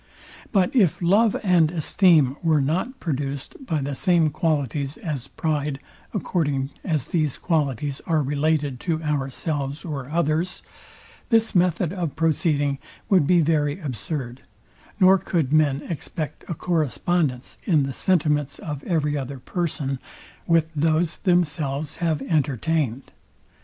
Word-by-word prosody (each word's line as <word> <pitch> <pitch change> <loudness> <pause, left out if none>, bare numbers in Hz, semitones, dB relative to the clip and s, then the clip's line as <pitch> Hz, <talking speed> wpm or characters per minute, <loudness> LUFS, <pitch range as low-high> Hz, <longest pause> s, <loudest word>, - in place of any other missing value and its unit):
But 195 +2 +2
if 195 - +3
love 200 +5 +3
and 175 -5 +4
esteem 160 -4 +3
were 160 -3 +3
not 180 - -1
produced 140 - -4
by 160 - -1
the 140 +1 -3
same 165 +1 +2
qualities 145 -2 -1
as 145 -7 -4
pride, 150 -3 -2 0.3
according 145 -9 -1
as 155 -7 -1
these 155 -5 0
qualities 145 - -1
are 160 -3 +2
related 145 -1 0
to 165 +1 -2
ourselves 145 0 -2
or 140 -5 -5
others, 165 +2 0 0.7
this 225 -2 +3
method 175 -2 +2
of 170 -7 -3
proceeding 150 -3 +1 0.3
would 180 -8 +4
be 175 0 +5
very 150 0 +1
absurd, 130 - -4 0.6
nor 190 +1 +6
could 155 -7 -1
men 145 -3 +3
expect 155 -1 -5
a 170 - -3
correspondence 155 -4 -1
in 160 -7 +3
the 135 0 -3
sentiments 150 -4 +1
of 145 -2 -6
every 150 -4 0
other 135 -1 -4
person, 145 -2 -3 0.5
with 165 -1 +3
those 160 +2 +1
themselves 155 -5 0
have 160 -5 0
entertained. 140 -2 0
155 Hz, 125 wpm, -24 LUFS, 140-170 Hz, 0.7 s, nor